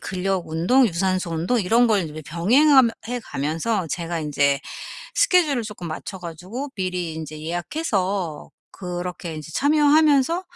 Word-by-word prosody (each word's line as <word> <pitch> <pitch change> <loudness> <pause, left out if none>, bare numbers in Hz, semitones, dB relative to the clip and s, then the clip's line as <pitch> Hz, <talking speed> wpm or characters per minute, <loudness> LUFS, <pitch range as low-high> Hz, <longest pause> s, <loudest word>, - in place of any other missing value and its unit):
근력 190 -1 -2
운동, 180 +12 +3
유산소 185 -1 -1
운동 180 +9 0
이런 230 +6 +3
걸 215 -3 +3
인제 155 -1 -7
병행하 260 - +5 0.3
해 245 0 -2
가면서 165 +6 -2
제가 170 0 -3
인제 140 -2 +1 0.6
스케줄을 355 - +3
쪼끔 205 -6 -7
맞춰 185 +4 -6
가지고 180 - -7
미리 180 -3 -2
인제 155 -1 -7
예약해서 185 - -2 0.2
그렇게 180 -2 -5
인제 155 +1 -8
참여하면서 300 +2 +3
185 Hz, 305 characters per minute, -23 LUFS, 165-245 Hz, 0.6 s, 병행하